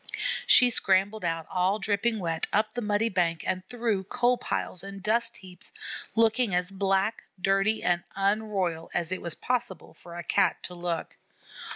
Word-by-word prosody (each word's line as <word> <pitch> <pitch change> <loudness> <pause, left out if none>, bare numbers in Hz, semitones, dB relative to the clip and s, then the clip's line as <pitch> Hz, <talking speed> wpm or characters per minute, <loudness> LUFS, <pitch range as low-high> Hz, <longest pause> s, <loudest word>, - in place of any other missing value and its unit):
She 250 -1 +8
scrambled 195 0 +2
out 165 -1 -1
all 185 +2 +1
dripping 215 +2 0
wet, 165 -4 -2
up 215 +1 +1
the 245 - -3
muddy 210 +1 +1
bank 170 -4 0
and 185 0 -1
through 225 -6 -1
coal 245 +4 +2
piles 185 -6 -3
and 195 -1 -8
dust 230 +2 +1
heaps, 185 -2 -8 0.4
looking 225 -2 +3
as 180 +1 0
black, 195 +2 0
dirty, 195 +3 +2
and 175 -1 +1
unroyal 195 -5 0
as 170 -1 -1
it 185 - -2
was 170 -2 -2
possible 240 -9 -3
for 170 -1 -12
a 175 - -5
Cat - - +1
to 180 - -5
look. 175 -1 -4
195 Hz, 165 wpm, -27 LUFS, 180-220 Hz, 0.4 s, She